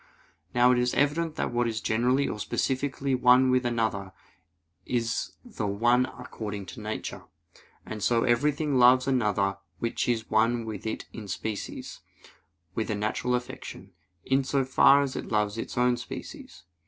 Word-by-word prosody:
Now 125 +1 +6
it 125 - +3
is 125 0 0
evident 155 +3 +1
that - - -2
what 120 0 +1
is 110 -1 -2
generically 125 +5 +1
or 105 - -4
specifically 135 +4 -1
one 130 +1 +5
with 125 -1 +2
another, 110 -5 -1 0.7
is 115 -1 -2
the 170 - -4
one 120 +5 +2
according 105 -5 -6
to - - -9
nature. 110 +1 -5 0.6
And 110 -1 -6
so 115 +2 +2
everything 140 +3 +1
loves 125 +1 +6
another 105 -6 +1 0.2
which 115 +1 -2
is 115 -2 0
one 115 +1 +2
with 110 -2 -6
it 110 - -4
in 110 -3 -8
species, 105 +1 -5 0.7
with 110 - -2
a 110 - 0
natural 110 +4 -1
affection, 125 0 -7 0.3
in 135 +1 +2
so 135 0 0
far 140 +2 +5
as 135 -2 -4
it - - -5
loves 105 -1 0
its - - -6
own 125 0 +3
species. - - -9
120 Hz, 155 wpm, -27 LUFS, 110-130 Hz, 0.7 s, Now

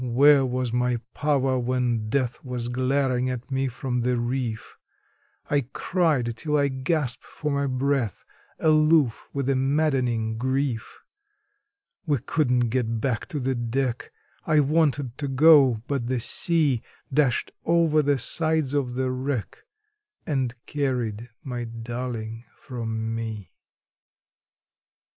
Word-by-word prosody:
where 135 +3 +5
was 125 -2 -1
my 125 0 +1 0.2
power, 135 -3 +1
when 120 -3 0
Death 125 -1 -1
was 125 -2 -4
glaring 130 0 +1
at 125 +1 -5
me 135 0 0
from 125 0 -3
the 125 +1 +1
reef? 120 -2 -3 0.7
I 140 -4 0
cried 150 -10 +1
till 150 +2 0
I 140 -1 +2
gasped 130 0 -1
for 150 - -4
my 140 0 0
breath, 130 -4 -1 0.3
aloof 155 -5 +3
with 140 -2 -2
a 135 - +2
maddening 130 -5 +1
grief. 130 -2 -2 1.1
We 145 -2 +3
couldn't 125 -2 +1
get 115 -2 -1
back 125 -2 -1
to 155 -6 -4
the 130 0 0
deck: 120 +1 -2 0.3
I 155 -2 +3
wanted 145 -4 +1
to 145 - -2
go, 135 -5 +5
but 135 -4 -2
the 130 0 0
sea 145 0 +1 0.3
Dashed 135 -4 +2
over 165 -2 +3
the 145 -1 +2
sides 155 +2 0
of 130 -4 -1
the 130 0 0
wreck, 130 -2 -4 0.6
and 130 -5 -1
carried 125 -5 -2
my 125 -3 -4
darling 115 0 -5
from 115 -3 -4
me. 110 -3 -5
130 Hz, 125 wpm, -25 LUFS, 120-140 Hz, 1.1 s, where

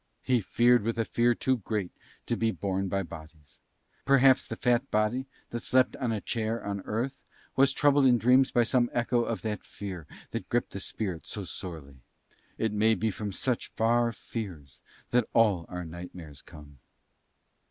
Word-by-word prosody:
He 125 -3 +2
feared 120 +4 +4
with 115 +3 -2
a 115 - +1
fear 120 +1 +2
too 130 +2 +1
great 105 -3 -3 0.3
to 120 - 0
be 115 -1 +1
borne 95 -2 -2
by 100 +1 -1
bodies. 80 -4 -12 0.4
Perhaps 135 -1 +5
the - - -4
fat 125 +2 +1
body 110 +5 0 0.2
that 120 - -3
slept 130 +2 +3
on 125 -4 -1
a 110 - -1
chair 115 +1 -2
on 100 -1 -3
earth 125 +5 -2 0.4
was 135 0 +5
troubled 145 -1 +4
in 125 -1 +5
dreams 130 +3 +4
by 120 - +3
some 120 0 +2
echo 120 0 +1
of 115 -1 -3
that 105 -2 -3
fear 95 -6 -7 0.2
that - - -5
gripped 120 0 0
the 100 - -5
spirit 95 -4 -4
so 105 - -5
sorely. 80 -6 -8
And - - -28 0.6
it 110 -2 0
may 110 +2 +3
be 110 0 0
from 105 +1 -5
such 125 +5 -1
far 115 +1 +2
fears 90 - -8 0.3
that 120 -2 +2
all 105 -7 +3
our 90 -1 -5
nightmares 85 -3 -9
come. 70 -3 -14
110 Hz, 175 wpm, -29 LUFS, 95-120 Hz, 0.6 s, Perhaps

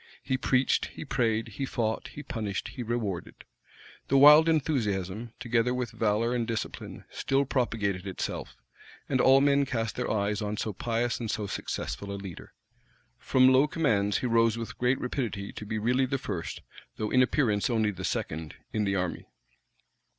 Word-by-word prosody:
He 130 - 0
preached, 130 0 +2
he - - -9
prayed, 115 -4 0
he 110 +6 -5
fought, 110 -3 -2
he 145 - -9
punished, 110 -9 -3
he - - -7
rewarded. 110 -6 -3 0.6
The 135 - +3
wild 150 +3 +9
enthusiasm, 115 - 0
together 120 +1 +1
with 125 -3 -2
valor 110 +2 +1
and 120 -2 -1
discipline, 115 -2 -5
still 135 +1 +1
propagated 105 -8 -1
itself; 95 - -4 0.5
and 130 -2 +2
all 135 +1 +6
men 140 0 +4
cast 115 -5 -2
their - - -2
eyes 105 -1 0
on 105 0 -3
so 110 - -2
pious 115 +3 -1
and 115 -2 -4
so 105 -1 -2
successful 100 0 -4
a 100 - -4
leader. 95 -4 -9 0.7
From 130 0 +4
low 130 +3 +5
commands, 105 -11 +1
he - - -3
rose 115 -1 +3
with 115 -1 -6
great 125 +2 +2
rapidity 115 -6 -3
to 105 - -8
be 110 - -2
really 125 +4 +2
the 135 - -1
first, 90 -9 -5 0.3
though 105 - -3
in 125 - +5
appearance 120 -5 +2
only 110 -3 +2
the 95 -2 -8
second, 80 -2 -3 0.2
in 105 -1 +1
the 100 -1 0
army. 90 -2 -2
115 Hz, 170 wpm, -28 LUFS, 105-130 Hz, 0.7 s, wild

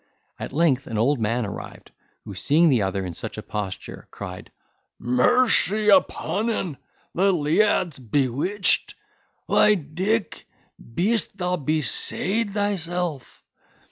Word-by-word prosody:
At - - -6
length 140 -3 +1
an 115 - -4
old 130 +5 +2
man 115 +2 0
arrived, 100 - -9 0.3
who, 100 - -7
seeing 150 - +3
the 125 -6 +3
other 95 0 -2
in 90 - -5
such - - -7
a - - -6
posture, 100 -3 -6
cried, 90 -2 -9 0.5
"Mercy 215 - +3
upon 200 +2 +2
en! 180 -10 -3 0.4
the 195 +3 +3
leaad's 170 0 +1
bewitched! 140 - +1 0.5
why, 210 0 +4
Dick, 190 +7 -2 0.3
beest 195 - -1
thou 180 -1 0
besayd 170 - -1
thyself!" 180 -7 -3
160 Hz, 115 wpm, -23 LUFS, 125-200 Hz, 0.5 s, why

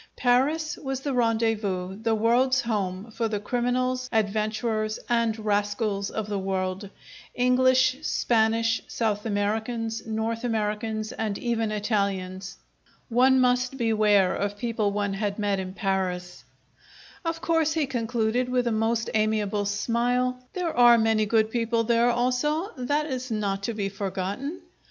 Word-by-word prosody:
Paris 280 +6 +1
was 270 -2 -4
the 280 0 -2
rendezvous, 220 -6 0
the 225 -1 +1
world's 250 +4 +3
home, 205 -2 -3
for 225 +1 -1
the 210 -2 -2
criminals, 255 +3 -1
adventurers, 215 0 0
and 230 -2 +1
rascals 205 -1 -1
if 220 - -3
the 205 -1 -3
world, 190 0 -2 0.5
English, 255 +1 +3
Spanish, 225 -4 +1
South 215 -1 -1
Americans, 220 +2 -2
North 225 +1 -2
Americans, 215 -1 -2
and 215 -3 -3
even 225 -2 -1
Italians! 195 -3 -2 0.5
One 260 +2 +4
must 250 +1 +2
beware 215 -5 +3
of 205 0 -2
people 225 -2 -1
one 205 -1 -1
had 200 0 -2
met 205 -2 0
in 185 0 -6
Paris! 185 -3 -2 0.8
"Of 330 -1 -2
course," 325 -2 +1
he 315 -2 +1
concluded, 240 -1 -1
with 250 -1 +1
a 235 - +1
most 225 +1 0
amiable 215 -1 +1
smile, 245 +4 0
"there 355 -3 -2
are 240 -1 +7
many 220 -1 +2
good 220 0 +2
people 230 -1 0
there 235 +1 +3
also. 255 - 0
That 290 +4 0
is 260 -3 -4
not 200 -3 -1
to 230 - -3
be 200 -2 -1
forgotten. 200 - -4
225 Hz, 135 wpm, -26 LUFS, 205-245 Hz, 0.8 s, are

